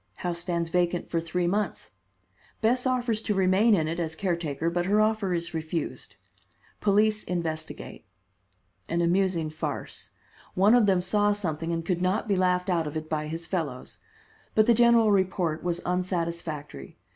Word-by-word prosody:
House 175 -1 -2
stands 170 -1 -2
vacant 175 0 0
for 165 - +1
three 175 +2 -1
months. 205 +4 -2 0.7
Bess 245 +3 +2
offers 245 -4 0
to 210 -2 -1
remain 195 +4 +4
in 160 -4 0
it 165 +2 -3
as 160 -2 -2
caretaker, 170 -3 -1
but 175 +1 -1
her 205 +2 +3
offer 215 -3 +1
is 170 -1 -2
refused. 155 -9 -4 0.6
Police 210 +1 +2
investigate. 160 -3 -4 0.9
An 170 +1 0
amusing 170 -2 +1
farce. 155 - -5 0.5
One 200 +4 +5
of 240 -4 +5
them 190 -2 +3
saw 205 +3 +2
something 165 -5 -3
and 165 -1 -2
could 175 -1 -1
not 190 +5 0
be 200 - +2
laughed 180 0 +1
out 170 -4 +1
of 150 +1 -4
it 155 0 -6
by 155 -1 -2
his 165 +2 -4
fellows. 150 -10 -4 0.6
But 215 - +5
the 235 - +5
general 235 -2 +5
report 185 -5 +1
was 175 0 -1
unsatisfactory. 170 - -3
180 Hz, 160 wpm, -27 LUFS, 165-205 Hz, 0.9 s, One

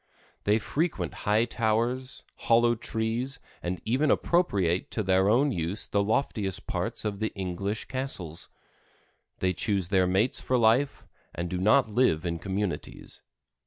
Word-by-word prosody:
They 105 +1 +4
frequent 115 - -2 0.2
high 110 +3 +4
towers, 120 +3 -1
hollow 120 +1 +3
trees, 115 +3 -2 0.2
and 90 +1 -3
even 130 +7 +2
appropriate 95 - +2
to 110 - -2
their 95 +1 +3
own 135 +6 +4
use 85 +1 -2
the 100 0 +1
loftiest 105 -3 -1
parts - - -2
of 100 -2 -2
the 110 0 -1
English 100 +2 -3
castles. 115 - -3 0.9
They 95 0 +2
choose 95 -1 0
their 95 -2 +3
mates 95 +7 +1
for 130 - +1
life, 120 +5 +2 0.3
and 85 +1 -3
do 90 - -1
not 110 +7 +4
live 105 -8 +2
in 85 -1 -2
communities. 100 0 -4
105 Hz, 140 wpm, -28 LUFS, 95-120 Hz, 0.9 s, They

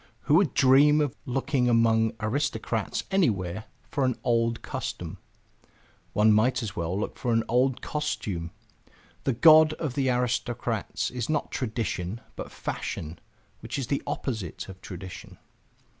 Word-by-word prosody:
Who - - 0
would 165 -3 +4
dream 140 +3 +6
of 145 -5 0
looking 130 0 +1
among 115 -1 +3
aristocrats 110 -2 -1
anywhere 105 - +1 0.2
for 140 - -2
an 130 -2 +2
old 115 -1 +1
custom? - - -5 0.9
One 105 +1 +5
might 120 +4 +2
as 105 -5 -5
well 85 +3 -2
look 105 - -4
for 120 - -1
an 115 0 +3
old 125 +2 +1
costume! 105 - -3 0.8
The 135 - +2
god 155 +4 +7
of 155 -4 -3
the 135 0 +1
aristocrats 120 -2 -1
is 125 -2 -4
not 150 -2 -1
tradition, 110 -5 -3 0.2
but - - -7
fashion, 80 +2 -5 0.4
which - - -5
is 135 - -2
the 140 +4 -1
opposite 110 - -4
of 95 -1 -11
tradition. 90 0 -9
120 Hz, 140 wpm, -27 LUFS, 110-135 Hz, 0.9 s, god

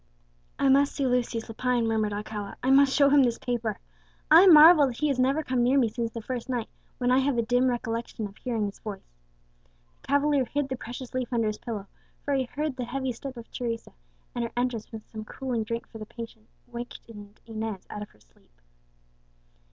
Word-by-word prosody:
"I 275 - +2
must 280 +1 +4
see 280 - 0
Lucius 245 -2 0
Lepine," 240 +1 0
murmured 220 -2 0
Alcala; 205 -1 -5
"I 260 - +3
must 275 0 +6
show 280 0 +5
him 285 0 +6
this 240 -3 +2
paper. 235 -4 -2 0.5
I 340 +5 +9
marvel 315 -3 +9
that 240 -3 -5
he 300 +2 +1
has 270 -2 0
never 270 +5 +2
come 255 -3 0
near 250 +3 +3
me 245 -4 +3
since 230 +1 -3
the 230 -1 -7
first 250 +1 -5
night, 240 -3 -2 0.3
when 250 0 +1
I 255 - +5
have 270 -1 +1
a 235 - +2
dim 245 +3 +2
recollection 230 -2 -3
of 200 0 -9
hearing 230 -4 -2
his 200 - -6
voice." 200 - -8 0.9
The - - -19
cavalier 285 -1 +2
hid 285 +3 -2
the 260 - -2
precious 245 +1 -8
leaf 255 -1 -2
under 230 -2 +1
his 215 0 -2
pillow; 215 -4 -5 0.4
for 285 - 0
he 265 -1 +1
heard 290 +1 -3
the 250 - -3
heavy 265 +2 -2
step 260 +2 -8
of 230 - -11
Teresa, 230 -2 -4 0.4
and 240 - -2
her 230 - -4
entrance 245 -3 -2
with 220 -2 -9
some 220 -1 -7
cooling 240 0 -3
drink 230 +1 -4
for 225 - -11
the 215 - -8
patient 230 -2 -10 0.2
wakened 230 -4 -10
Inez 220 -3 -5
out 210 - -6
of 210 - -7
her - - -26
sleep. - - -29
240 Hz, 210 wpm, -27 LUFS, 225-265 Hz, 0.9 s, I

